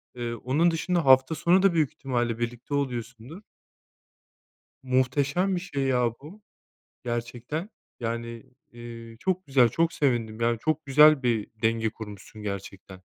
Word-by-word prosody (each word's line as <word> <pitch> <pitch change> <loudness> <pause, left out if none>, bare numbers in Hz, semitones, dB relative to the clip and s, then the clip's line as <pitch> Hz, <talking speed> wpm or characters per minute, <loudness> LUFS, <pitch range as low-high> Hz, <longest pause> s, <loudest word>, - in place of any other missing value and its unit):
Eee, 120 -1 -4
onun 140 +9 +1
dışında 170 -1 -1
hafta 130 +3 +5
sonu 180 +5 +3
da 195 -3 +4
büyük 155 -4 +1
ihtimalle 120 -4 -2
birlikte 120 +4 -4
oluyorsundur. 125 - -4 1.4
Muhteşem 140 +8 +1
bir - - -2
şey 145 -7 -4
ya 125 -3 +2
bu 175 +9 -12 0.6
gerçekten. 120 - -4 0.3
Yani, 115 0 -4 0.3
eee, 115 -1 -10
çok 185 0 -1
güzel, 130 -3 +4
çok 165 +7 +1
sevindim. 115 -5 0
Yani, 115 -1 +1
çok 155 +3 -1
güzel 150 0 +6
bir 115 -4 0
denge 110 0 +1
kurmuşsun 105 0 -10
gerçekten. 100 -2 -7
125 Hz, 130 wpm, -26 LUFS, 115-155 Hz, 1.4 s, güzel